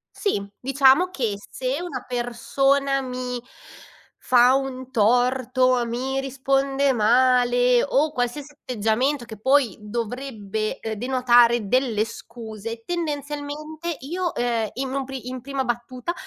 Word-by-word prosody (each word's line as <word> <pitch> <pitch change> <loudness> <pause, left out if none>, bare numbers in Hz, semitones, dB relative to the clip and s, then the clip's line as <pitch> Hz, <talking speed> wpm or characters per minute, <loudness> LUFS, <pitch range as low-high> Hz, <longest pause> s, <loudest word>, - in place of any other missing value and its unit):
Sì, 205 - -1
diciamo 275 +6 +4
che 235 - -2
se 260 +3 -2
una 355 -1 -5
persona 270 +3 +1
mi 250 -1 -4 0.8
fa 250 +1 +5
un 260 -1 -3
torto, 250 +2 +2
mi 260 +3 -2
risponde 270 +1 +1
male 245 +1 +4
o 290 +2 +2
qualsiasi 275 +4 -3
atteggiamento 250 +1 -1
che 220 -2 -10
poi 265 -4 +3
dovrebbe, 220 -1 -4
uhm, 220 - -3
denotare 240 -1 +3
delle 240 -4 +2
scuse, 230 -1 -8
tendenzialmente 305 0 -4
io, 350 +6 -3
ehm, 235 -3 0
in 265 0 -3
un 275 -1 -1
pr 270 - -10
in 255 0 -5
prima 275 +1 -3
battuta 250 +5 -3
255 Hz, 120 wpm, -23 LUFS, 240-275 Hz, 0.8 s, fa